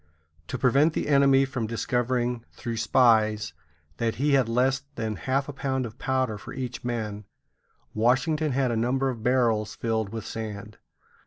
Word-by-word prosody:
To -, -, -3 dB
prevent 140 Hz, +5 st, +3 dB
the -, -, -2 dB
enemy 140 Hz, -1 st, +5 dB
from 130 Hz, -4 st, -3 dB
discovering, 120 Hz, +1 st, -1 dB
through 115 Hz, -2 st, -5 dB
spies, 110 Hz, -5 st, +3 dB, 0.4 s
that 115 Hz, -1 st, -1 dB
he 145 Hz, +4 st, +1 dB
had 130 Hz, -4 st, +3 dB
less 130 Hz, +3 st, +2 dB
than 110 Hz, -3 st, -3 dB
half 130 Hz, -, -1 dB
a 145 Hz, -, -6 dB
pound 130 Hz, -1 st, -2 dB
of 115 Hz, +1 st, -9 dB
powder 130 Hz, -5 st, -1 dB
for -, -, -9 dB
each 125 Hz, -2 st, -5 dB
man, 110 Hz, -4 st, -3 dB, 0.7 s
Washington 140 Hz, +7 st, +1 dB
had 130 Hz, -1 st, +1 dB
a -, -, 0 dB
number 130 Hz, +4 st, +1 dB
of 120 Hz, -4 st, -5 dB
barrels 115 Hz, -3 st, +1 dB
filled 110 Hz, -3 st, -1 dB
with 110 Hz, 0 st, -6 dB
sand. 105 Hz, -1 st, -6 dB
120 Hz, 160 wpm, -26 LUFS, 110-130 Hz, 0.7 s, enemy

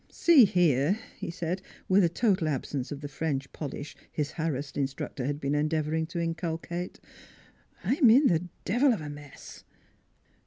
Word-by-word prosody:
" -, -, -36 dB, 0.2 s
See 315 Hz, -9 st, +9 dB
here," 175 Hz, -2 st, +3 dB, 0.2 s
he -, -, -6 dB
said, 170 Hz, +2 st, -3 dB, 0.3 s
with 190 Hz, +1 st, +5 dB
a 170 Hz, -, +4 dB
total 185 Hz, -2 st, +1 dB
absence 135 Hz, -2 st, -3 dB
of 145 Hz, -1 st, -5 dB
the 145 Hz, -, -4 dB
French 140 Hz, -1 st, -3 dB
polish 145 Hz, 0 st, -6 dB, 0.2 s
his 150 Hz, -1 st, -2 dB
harassed 150 Hz, -4 st, -3 dB
instructor 135 Hz, -1 st, -3 dB
had 145 Hz, 0 st, -2 dB
been 140 Hz, -1 st, -1 dB
endeavoring 155 Hz, +1 st, 0 dB
to 170 Hz, +1 st, -4 dB
inculcate. 170 Hz, +1 st, -3 dB, 0.4 s
" -, -, -30 dB
I'm 270 Hz, -3 st, +4 dB
in 265 Hz, +6 st, +6 dB
the 175 Hz, -5 st, +2 dB, 0.2 s
devil 245 Hz, +6 st, +3 dB
of 210 Hz, -, -4 dB
a 150 Hz, -, -6 dB
mess." 145 Hz, -1 st, -11 dB
160 Hz, 165 wpm, -28 LUFS, 145-180 Hz, 0.4 s, See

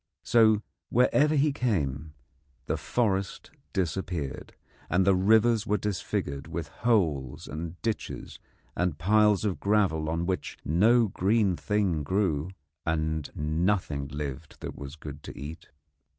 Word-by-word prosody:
So 110 Hz, -2 st, +4 dB, 0.3 s
wherever 145 Hz, +5 st, +4 dB
he 145 Hz, 0 st, +3 dB
came 80 Hz, -, -1 dB, 0.5 s
the -, -, 0 dB
forest 100 Hz, -5 st, -1 dB, 0.2 s
disappeared, 85 Hz, -5 st, -3 dB, 0.3 s
and 95 Hz, +1 st, +3 dB
the 100 Hz, -, +5 dB
rivers 110 Hz, +4 st, +4 dB
were 105 Hz, -, +2 dB
disfigured 90 Hz, -9 st, -3 dB
with -, -, -5 dB
holes 80 Hz, -, 0 dB
and 85 Hz, +3 st, -6 dB
ditches 115 Hz, -2 st, -4 dB, 0.4 s
and 90 Hz, -4 st, 0 dB
piles 105 Hz, +3 st, +3 dB
of 100 Hz, -4 st, -1 dB
gravel 95 Hz, -7 st, +2 dB
on 85 Hz, +1 st, -1 dB
which 95 Hz, 0 st, -3 dB
no 110 Hz, +10 st, +4 dB
green 100 Hz, 0 st, +2 dB
thing 100 Hz, -5 st, 0 dB
grew, 85 Hz, -1 st, 0 dB, 0.3 s
and 80 Hz, -2 st, -1 dB
nothing 75 Hz, -2 st, 0 dB
lived 75 Hz, +1 st, -6 dB
that -, -, -6 dB
was 70 Hz, +1 st, -8 dB
good 75 Hz, -2 st, -9 dB
to -, -, -9 dB
eat. 75 Hz, +4 st, -8 dB
90 Hz, 125 wpm, -28 LUFS, 75-105 Hz, 0.5 s, the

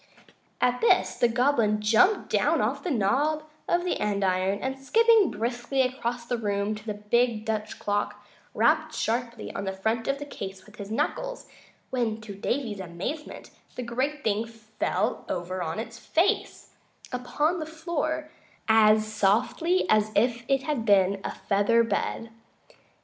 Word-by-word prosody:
At 250 Hz, 0 st, +1 dB
this 465 Hz, -, +4 dB
the 240 Hz, -, +3 dB
Goblin 235 Hz, -3 st, +2 dB
jumped 225 Hz, -, +3 dB
down -, -, +2 dB
off -, -, -1 dB
the 360 Hz, -, -2 dB
knob 290 Hz, +6 st, +1 dB, 0.3 s
of 350 Hz, 0 st, +2 dB
the 360 Hz, -, -1 dB
andiron, 195 Hz, -1 st, +1 dB
and 265 Hz, 0 st, -3 dB
skipping 445 Hz, -, +4 dB
briskly 240 Hz, +3 st, -1 dB
across 245 Hz, -2 st, -3 dB
the 240 Hz, 0 st, -2 dB
room 205 Hz, -1 st, -1 dB
to 215 Hz, -1 st, -8 dB
the 215 Hz, -2 st, -4 dB
big 220 Hz, +1 st, +1 dB
Dutch 215 Hz, -1 st, -3 dB
clock, 205 Hz, 0 st, -2 dB, 0.3 s
rapped -, -, +2 dB
sharply 235 Hz, 0 st, -2 dB
on -, -, -4 dB
the 190 Hz, -, -1 dB
front 220 Hz, +4 st, -1 dB
of 275 Hz, 0 st, +1 dB
the 290 Hz, -, -6 dB
case 190 Hz, -8 st, -8 dB
with 210 Hz, -, -17 dB
his 200 Hz, -1 st, -7 dB
knuckles, -, -, -2 dB, 0.4 s
when, 235 Hz, -4 st, -1 dB
to 215 Hz, -2 st, -8 dB
Davy's 215 Hz, +1 st, -2 dB
amazement, 190 Hz, -, -6 dB, 0.2 s
the 250 Hz, -, -4 dB
great 260 Hz, +5 st, -2 dB
thing 220 Hz, +1 st, 0 dB
fell 220 Hz, -1 st, -2 dB
over 185 Hz, +1 st, -3 dB
on 160 Hz, -1 st, -3 dB
its 230 Hz, +1 st, -6 dB
face 345 Hz, -, 0 dB, 0.4 s
upon 295 Hz, +8 st, 0 dB
the 310 Hz, -, -4 dB
floor 315 Hz, -1 st, -3 dB, 0.4 s
as 215 Hz, -1 st, +5 dB
softly 220 Hz, -, +1 dB
as 215 Hz, 0 st, +3 dB
if 235 Hz, +2 st, +2 dB
it 270 Hz, -1 st, +2 dB
had 290 Hz, -5 st, -1 dB
been 195 Hz, -2 st, +3 dB
a -, -, -2 dB
feather 205 Hz, +3 st, +2 dB
bed. 230 Hz, 0 st, -2 dB
230 Hz, 155 wpm, -27 LUFS, 210-275 Hz, 0.4 s, as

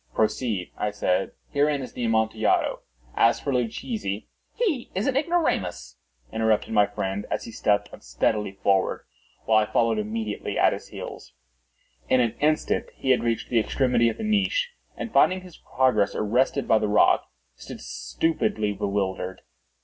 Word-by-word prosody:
"Proceed," 110 Hz, -4 st, 0 dB
I 105 Hz, -, 0 dB
said; 95 Hz, -2 st, 0 dB, 0.2 s
"herein 145 Hz, -1 st, +1 dB
is -, -, -9 dB
the 125 Hz, -, -4 dB
Amontillado. 110 Hz, -1 st, +1 dB, 0.4 s
As 115 Hz, -, +4 dB
for 140 Hz, -, -2 dB
Luchesi—" 120 Hz, -, -2 dB, 0.3 s
"He 345 Hz, -, -1 dB
is 195 Hz, -, 0 dB
an 265 Hz, -, +1 dB
ignoramus," 185 Hz, -, 0 dB, 0.4 s
interrupted 110 Hz, 0 st, +1 dB
my 105 Hz, -1 st, +5 dB
friend, 100 Hz, 0 st, -3 dB
as -, -, -2 dB
he -, -, -8 dB
stepped 105 Hz, -1 st, 0 dB
unsteadily 105 Hz, -3 st, -1 dB
forward, 95 Hz, -1 st, +1 dB, 0.4 s
while 110 Hz, -1 st, +5 dB
I 105 Hz, -, -1 dB
followed 115 Hz, -2 st, +2 dB
immediately 105 Hz, 0 st, -3 dB
at -, -, +4 dB
his -, -, -7 dB
heels. -, -, -9 dB, 0.8 s
In 130 Hz, -, +4 dB
an 120 Hz, -3 st, +2 dB
instant 155 Hz, +1 st, +1 dB
he 130 Hz, -, 0 dB
had 130 Hz, -, +3 dB
reached 115 Hz, -1 st, -1 dB
the 120 Hz, -, +4 dB
extremity 120 Hz, 0 st, +2 dB
of 115 Hz, -, -5 dB
the -, -, -5 dB
niche, 215 Hz, -, +1 dB, 0.3 s
and 230 Hz, -, -5 dB
finding 185 Hz, 0 st, +4 dB
his 180 Hz, -3 st, -13 dB
progress 125 Hz, -6 st, +1 dB
arrested 125 Hz, +6 st, +1 dB
by 110 Hz, -, +5 dB
the 105 Hz, -, 0 dB
rock, 105 Hz, -, +4 dB, 0.3 s
stood -, -, -10 dB
stupidly 110 Hz, -10 st, -1 dB
bewildered. 95 Hz, -2 st, -2 dB
115 Hz, 155 wpm, -25 LUFS, 105-140 Hz, 0.8 s, my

